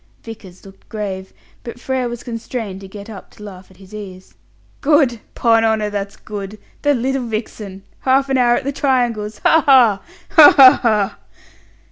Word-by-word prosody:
Vickers 200 -6 -12
looked 195 0 -17
grave, 195 -3 -6 0.3
but 240 0 -9
Frere 255 -1 -3
was 240 0 -8
constrained 230 -4 -6
to 195 - -10
get 200 +1 -11
up 205 -4 -11
to 210 - -16
laugh 190 -2 -12
at 190 - -21
his 195 +1 -17
ease. 190 -3 -10 0.5
"Good! 280 -6 +2 0.2
'Pon 225 -1 +2
honour, 220 -2 0
that's 200 -1 -5
good! 205 0 -8 0.2
The 290 -1 +2
little 260 0 -2
vixen! 215 -3 -7 0.2
Half 270 +1 +1
an 265 - +1
hour 240 -1 +3
at 275 - -3
the 280 - -2
triangles! 240 -7 -1
Ha 325 - +4
ha! 240 -8 +4 0.3
ha, 310 -3 +8
ha, 260 -2 +8
ha!" 215 -5 0
220 Hz, 170 wpm, -18 LUFS, 200-255 Hz, 0.5 s, ha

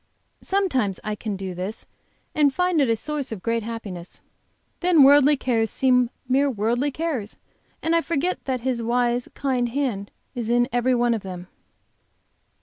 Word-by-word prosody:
Sometimes 265 - 0
I 215 - -2
can 210 0 -4
do 190 -1 -5
this 185 +5 -5 0.5
and 295 -2 +4
find 360 0 +1
it 270 - +2
a 230 - +3
source 290 +3 -4
of 210 -5 -6
great 230 0 0
happiness. 210 -6 -7 0.6
Then 350 -5 +5
worldly 285 +1 +6
cares 230 -4 0
seem 250 -2 +2 0.2
mere 275 +3 +3
worldly 240 +4 0
cares, 280 -8 -3 0.5
and 325 +1 +2
I 335 - +4
forget 335 +2 -1
that 255 -2 -2
His 250 -1 -1
wise, 240 +1 0
kind 255 -3 0
hand 235 -7 -2 0.2
is 235 -2 -4
in 240 0 +3
every 245 +1 +2
one 240 0 +2
of 225 - -2
them. 180 -1 -8
245 Hz, 160 wpm, -24 LUFS, 225-280 Hz, 0.6 s, worldly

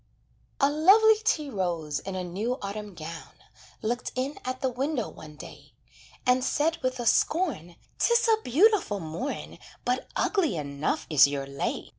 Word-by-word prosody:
A 275 - +5
lovely 415 +8 +6
tea 305 -10 0
rose, 170 - -2
in 195 -1 -6
a 185 - -3
new 210 +8 -3
autumn 200 0 -6
gown, 165 0 -8 0.5
Looked 240 +3 -2
in 265 +3 -3
at 255 0 -4
the 265 - +1
window 260 0 -2
one 155 -1 -12
day, - - -12 0.5
And 250 0 +3
said 320 +5 0
with 255 0 -2
a 240 - -3
scorn: 240 - +1 0.2
"'Tis 470 0 +3
a 440 -1 +3
beautiful 340 - +3
morn; 165 - -5 0.3
But 250 +1 -1
ugly 365 - +1
enough 140 0 -2
is 140 -2 +7
your 140 -1 -3
lay. 140 0 -4
245 Hz, 155 wpm, -27 LUFS, -, 0.5 s, is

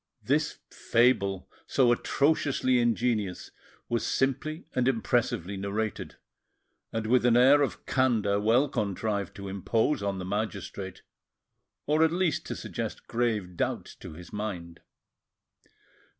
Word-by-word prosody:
This - - 0
fable, 105 -6 +2 0.2
so 125 -3 +3
atrociously 135 -1 +2
ingenious, 115 -5 0 0.4
was 120 -1 -1
simply 135 +4 -1
and 125 -1 +1
impressively 115 -6 0
narrated, 105 +3 -3 0.8
and 115 -1 -2
with 120 +2 +3
an 120 -1 +4
air 135 +4 +6
of 140 - -2
candour 110 -6 +2
well 115 +7 +3
contrived 100 -4 -2
to 100 0 -7
impose 110 - 0
on 100 -1 -2
the 90 - -5
magistrate, 105 +1 -4 0.8
or, 155 +2 +3
at 160 - +4
least, 175 -3 0
to - - -4
suggest - - -5
grave 110 -7 -1
doubts - - -2
to - - -10
his 85 +2 -12
mind. 95 -6 -5
115 Hz, 120 wpm, -28 LUFS, 100-130 Hz, 0.8 s, air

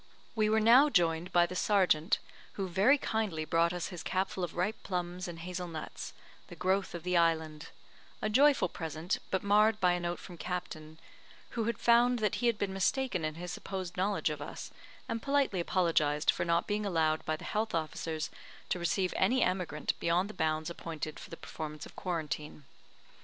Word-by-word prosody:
We 215 -1 +2
were 220 +1 +4
now 245 +7 +7
joined 170 - +1
by 175 -1 +5
the 180 - -6
sergeant, 185 -4 +3 0.4
who 195 -2 -3
very 195 +11 +4
kindly 210 - -2
brought 170 +1 +2
us 180 -1 -3
his 180 -4 -7
capful 190 0 -1
of 175 - -4
ripe 190 +5 -1
plums 180 0 -3
and 170 -1 -7
hazel 180 +1 -5
nuts, 160 -2 -7 0.3
the - - -10
growth 190 0 0
of 170 - -6
the 180 0 0
island; 160 -2 +1 0.5
a - - -1
joyful 275 +6 +4
present, 160 0 -3
but 190 - -1
marred 210 +2 +4
by 180 -3 +4
a 175 - 0
note 175 0 -2
from 175 -3 -11
Captain, 160 -3 -5 0.5
who 230 -2 -1
had 235 -2 -1
found 240 +1 +4
that 215 -3 0
he 240 - +3
had 230 -3 +2
been 200 -2 -2
mistaken 195 0 0
in 155 0 -2
his 175 +1 -6
supposed 185 -1 -5
knowledge 195 +2 0
of - - -5
us, - - -7 0.4
and 230 - -3
politely 275 -8 +1
apologised 160 -4 +2
for - - -2
not 170 0 +2
being 210 0 -1
allowed 160 -5 +1
by 155 - -1
the - - -10
health 215 -3 -1
officers 160 0 -3 0.4
to 180 - 0
receive 180 +2 0
any 245 +7 +3
emigrant 180 -5 -1
beyond 180 +5 +1
the - - -13
bounds 155 -1 -1
appointed 155 -2 -6
for - - -11
the 165 - -8
performance 155 -1 -7
of - - -14
quarantine. 155 -4 -4
180 Hz, 190 wpm, -31 LUFS, 165-205 Hz, 0.5 s, now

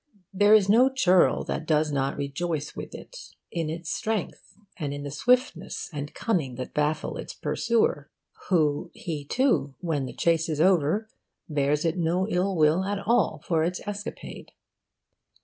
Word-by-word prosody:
There 205 +2 +6
is 205 -3 +4
no 240 +6 +5
churl 185 -9 +3
that 160 - -4
does 155 -1 +2
not 135 -1 -1
rejoice 145 +2 -3
with - - -7
it - - -11 0.2
in 165 -3 -2
its 165 0 -5
strength, 220 -4 -3 0.2
and 145 -4 -4
in 145 - -6
the 145 - -5
swiftness 235 - 0
and 145 0 -6
cunning 155 - -1
that 130 0 -6
baffle 150 +1 -1
its - - -7
pursuer, 220 -11 0 0.4
who, 155 -6 +2
he 155 -4 -5
too, 145 - +1
when 150 -7 -2
the - - -8
chase 165 -1 +1
is 155 -2 -2
over, 180 +4 +3 0.4
bears 150 0 0
it 165 +2 0
no 175 +3 +1
ill 190 0 0
will 160 +3 +3
at 200 +1 -2
all 205 -8 +1
for 160 -2 +1
its 180 +2 -1
escapade. 205 +1 -7
165 Hz, 160 wpm, -26 LUFS, 150-195 Hz, 0.4 s, There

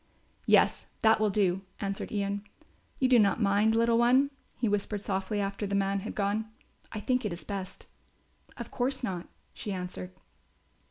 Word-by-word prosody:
"Yes, - - +4 0.2
that 220 -1 +6
will 215 -1 +3
do," 190 -2 +2 0.2
answered 195 -1 -3
Ian. 200 -1 -1 0.5
"You 260 - +3
do 250 -2 +6
not 200 -1 +3
mind, 210 +1 +3
little 230 0 +3
one," 260 +4 +4 0.3
he 235 - 0
whispered 205 0 -1
softly 195 +1 -1
after 200 +1 -2
the 200 - -1
man 195 0 +1
had 215 +4 -6
gone. 210 +2 0 0.4
"I 215 - -4
think 250 +4 0
it 210 - -1
is 170 - -6
best." 195 -2 -6 0.7
"Of - - -7
course 260 +1 -1
not," 180 -6 -3 0.3
she 210 - -5
answered. 180 - -5
205 Hz, 165 wpm, -29 LUFS, 195-225 Hz, 0.7 s, that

